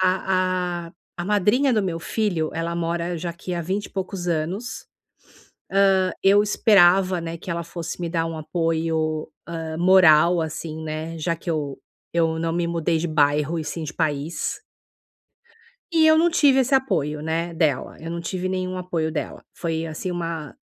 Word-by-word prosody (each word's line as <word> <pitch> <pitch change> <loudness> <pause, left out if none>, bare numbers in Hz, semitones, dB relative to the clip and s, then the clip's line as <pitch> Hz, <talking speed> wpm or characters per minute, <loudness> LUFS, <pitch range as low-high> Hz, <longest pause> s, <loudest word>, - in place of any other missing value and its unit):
A 185 -2 0
a - - -17 0.2
a 175 - -4
madrinha 210 +7 +3
do 215 -3 +2
meu 170 -3 -2
filho, 175 -5 -1
ela 165 +1 -2
mora 170 +1 -2
já 170 +1 -3
aqui 175 +1 -6
há 170 - -2
vinte 190 +5 -2
e - - -16
poucos 190 -1 -4
anos. 180 +9 -3 1.1
Hã, 185 0 +1
eu 200 +1 +6
esperava, 190 -3 +4
né, 165 0 -5
que 175 - -10
ela 170 0 -2
fosse 170 0 -6
me 170 - -2
dar 165 -1 0
um 165 -1 -4
apoio, 160 -1 -1 0.2
hã, 165 -1 -5
moral 175 -2 +6
assim, 160 0 -5
né. 160 +1 -5
Já 165 +2 -1
que 170 - -7
eu 145 -4 -2 0.3
eu 165 -1 +1
não 165 0 -1
me 170 0 0
mudei 170 -1 0
de 165 +2 -1
bairro 150 +1 +2
e - - -3
sim 160 +2 -4
de 155 0 -6
país. 155 - -2 1.3
E 325 -1 +4
eu 315 0 +6
não 340 +2 +4
tive 285 -5 +4
esse 265 +1 +1
apoio, 150 - +1
né, 165 +2 -2
dela. 155 -5 0
Eu 165 - -7
não 170 - -3
tive 185 +2 -3
nenhum 185 0 -2
apoio 170 -3 -2
dela. 150 -3 -5
Foi 165 -1 -3
assim 165 +3 -4
uma 165 -6 -4
170 Hz, 175 wpm, -23 LUFS, 160-185 Hz, 1.3 s, eu